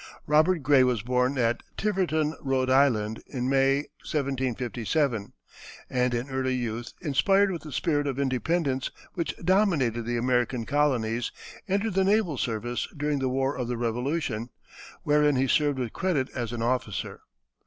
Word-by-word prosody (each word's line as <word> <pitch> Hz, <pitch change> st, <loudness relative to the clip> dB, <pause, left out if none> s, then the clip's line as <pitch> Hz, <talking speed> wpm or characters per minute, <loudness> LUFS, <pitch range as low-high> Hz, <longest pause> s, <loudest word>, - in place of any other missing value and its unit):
Robert 155 Hz, +2 st, +3 dB
Gray 135 Hz, -1 st, +5 dB
was 125 Hz, -5 st, +1 dB
born 125 Hz, +3 st, +1 dB
at 120 Hz, -1 st, +1 dB, 0.2 s
Tiverton, 175 Hz, -7 st, 0 dB
R. 135 Hz, -1 st, +1 dB
I., 135 Hz, +2 st, +6 dB, 0.4 s
in 125 Hz, -2 st, -3 dB
May, 135 Hz, 0 st, +3 dB, 0.3 s
1757, 130 Hz, -3 st, -1 dB, 0.6 s
and 125 Hz, 0 st, +1 dB
in 120 Hz, +3 st, -2 dB
early 130 Hz, -1 st, -1 dB
youth, 120 Hz, -1 st, -4 dB
inspired 195 Hz, +7 st, +3 dB
with 170 Hz, -, -4 dB
the 155 Hz, -, -9 dB
spirit 145 Hz, -1 st, 0 dB
of 135 Hz, -2 st, -2 dB
independence 135 Hz, +1 st, 0 dB, 0.2 s
which 170 Hz, -, -2 dB
dominated 170 Hz, -, +2 dB
the 120 Hz, +1 st, -1 dB
American 125 Hz, -1 st, 0 dB
Colonies, 120 Hz, -5 st, 0 dB, 0.4 s
entered 200 Hz, +2 st, 0 dB
the 190 Hz, +1 st, +3 dB
naval 195 Hz, -, +2 dB
service 120 Hz, +1 st, -2 dB
during 150 Hz, 0 st, 0 dB
the 130 Hz, -1 st, 0 dB
war 135 Hz, +2 st, 0 dB
of 125 Hz, -2 st, -3 dB
the 120 Hz, 0 st, -2 dB
Revolution, 120 Hz, 0 st, -2 dB, 0.5 s
wherein 150 Hz, -1 st, +3 dB
he 130 Hz, +1 st, +2 dB
served 145 Hz, +1 st, +2 dB
with 125 Hz, -4 st, -3 dB
credit 155 Hz, -8 st, 0 dB
as 120 Hz, -3 st, -3 dB
an 120 Hz, -1 st, -3 dB
officer. 120 Hz, -4 st, -2 dB
135 Hz, 150 wpm, -27 LUFS, 125-150 Hz, 0.6 s, I